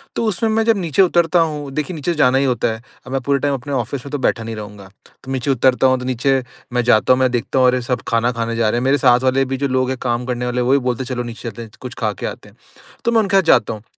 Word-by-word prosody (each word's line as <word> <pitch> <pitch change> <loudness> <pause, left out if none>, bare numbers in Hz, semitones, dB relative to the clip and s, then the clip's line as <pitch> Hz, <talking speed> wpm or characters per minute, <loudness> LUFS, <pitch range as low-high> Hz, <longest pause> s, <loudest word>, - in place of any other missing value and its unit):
तो 230 - -1
उसमें 220 +1 0
मैं 225 +1 +2
जब 225 -3 +3
नीचे 170 -1 +1
उतरता 175 -1 +3
हूँ 150 -4 -1
देखिए 155 +5 -3
नीचे 160 +3 -2
जाना 130 -5 +3
ही 140 - +2
होता 125 -2 0
है। 110 - -9 0.2
अब 125 - -10
मैं 135 -1 -1
पूरे 140 +2 0
टाइम 145 0 0
अपने 140 +2 -5
ऑफिस 130 +2 -3
में 140 - -8
तो 145 - -1
बैठा 120 -3 0
नहीं 115 0 -5
रहूँगा। 105 -2 -9 0.3
तो 135 - -7
नीचे 135 +1 -1
उतरता 130 +1 +3
हूँ 130 -1 +2
तो 125 - -6
नीचे 130 +1 +1 0.3
मैं 125 -1 +1
जाता 115 0 +4
हूँ, 130 - 0
मैं 130 -1 +3
देखता 125 +2 -1
हूँ 130 - +5
अरे! 125 0 +2
सब 125 0 -2
खाना 115 +1 +1
खाने 115 -1 -3
जा 115 -2 +1
रहे 120 +2 0
हैं। - - -3
मेरे 135 +2 +3
साथ 125 -2 +4
वाले 135 +1 +2
भी 135 +1 -3
जो 140 +1 -1
लोग 130 0 0
हैं 130 - -2
काम 120 0 -1
करने 125 -1 -3
वाले 125 0 -1
वो 125 +2 +1
भी 140 - +5
बोलते 125 +2 -2
हैं - - -9
चलो 120 - -2
नीचे 120 0 -7
चलते 115 +2 -9
हैं, 115 - -9
च 105 - -21
कुछ 125 -1 -7
खा 110 -3 0
के - - -7
आते - - -7
हैं। - - -24 0.5
तो 235 - +2
मैं 230 - +4
उनके 195 -1 0
साथ - - +6
जाता 115 -9 +3
हूँ। 105 0 -10
130 Hz, 315 wpm, -19 LUFS, 120-140 Hz, 0.5 s, साथ